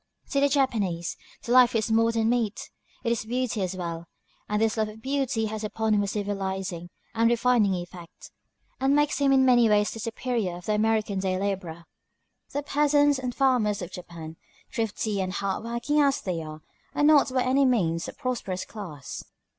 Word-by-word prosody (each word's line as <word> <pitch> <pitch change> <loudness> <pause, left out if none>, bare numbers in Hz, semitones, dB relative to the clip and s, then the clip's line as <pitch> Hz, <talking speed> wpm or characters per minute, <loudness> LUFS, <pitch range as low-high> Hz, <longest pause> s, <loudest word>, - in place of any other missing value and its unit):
To 280 - +2
the 285 0 +3
Japanese, 215 - 0 0.3
the 240 - -4
"life 250 -1 +6
is 225 0 0
more 230 +1 +4
than 225 -1 +1
meat," 230 -3 -1 0.3
it 235 - 0
is 235 - 0
beauty 240 -1 -2
as 185 0 -2
well; 170 -2 -5 0.4
and 210 0 +1
this 220 0 +2
love 215 -1 0
of 215 +1 -11
beauty 265 -3 -1
has 220 0 -4
upon 220 +1 0
him 205 - +3
a 200 - -1
civilizing 190 -4 -3 0.2
and 230 0 +3
refining 235 -4 +3
effect, 175 -1 -9 0.5
and 270 +2 +3
makes 295 -1 +2
him 280 -1 +3
in 265 -1 +5
many 240 -3 +5
ways 210 0 +3
the 225 - -7
superior 225 -4 -2
of 175 - -10
the 215 - 0
American 215 -2 +1
day 190 -1 0
laborer.[*239] 185 -4 -3 0.7
The 285 +1 -2
peasants 290 -1 +3
and 250 -2 -4
farmers 235 -8 +2
of 175 - -7
Japan, 165 -3 -9 0.4
thrifty 215 -3 -1
and 185 0 -3
hard 200 0 -2
working 235 +6 0
as 280 -1 +3
they 175 -4 -3
are, 155 0 -8 0.3
are - - +1
not 295 -2 +5
by 255 -1 +1
any 265 +2 +3
means 170 -10 +1
a - - -7
prosperous 225 -8 -3
class. 165 - -8
220 Hz, 185 wpm, -26 LUFS, 190-255 Hz, 0.7 s, life